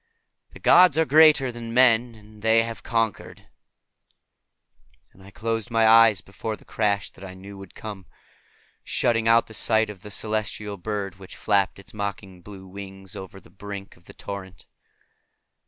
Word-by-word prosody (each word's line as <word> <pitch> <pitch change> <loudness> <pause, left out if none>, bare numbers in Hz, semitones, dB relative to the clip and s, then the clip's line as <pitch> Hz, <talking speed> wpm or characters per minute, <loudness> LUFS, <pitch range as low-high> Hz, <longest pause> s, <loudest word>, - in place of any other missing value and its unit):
The - - -12
gods 180 -5 +6
are 160 - +3
greater 150 -4 +5
than 115 -1 -7
men, 120 -2 +4
and 105 0 -17
they 110 +1 +4
have 115 0 -7
conquered." 115 -3 -3 1.7
And 95 - -20
I 95 - -14
closed 115 +3 -3
my 115 -1 +2
eyes 115 -3 +6
before 110 +3 -6
the - - -21
crash 100 -2 -1
that 95 - -16
I 95 -1 -9
knew 100 +2 -11
would 95 -1 -13
come, 100 -4 -9 0.8
shutting 115 -1 0
out 115 +1 +5
the 110 - -14
sight 110 0 +2
of 95 -3 -14
the 105 - -10
celestial 105 -1 -3
bird 100 0 -5
which 95 - -11
flapped 100 -2 +1
its 100 +4 -13
mocking 100 -3 -6
blue 95 0 -12
wings 95 0 -9
over 95 0 -9
the - - -21
brink 100 -1 -9
of 85 - -25
the - - -14
torrent. 95 -1 -9
105 Hz, 165 wpm, -24 LUFS, 95-115 Hz, 1.7 s, gods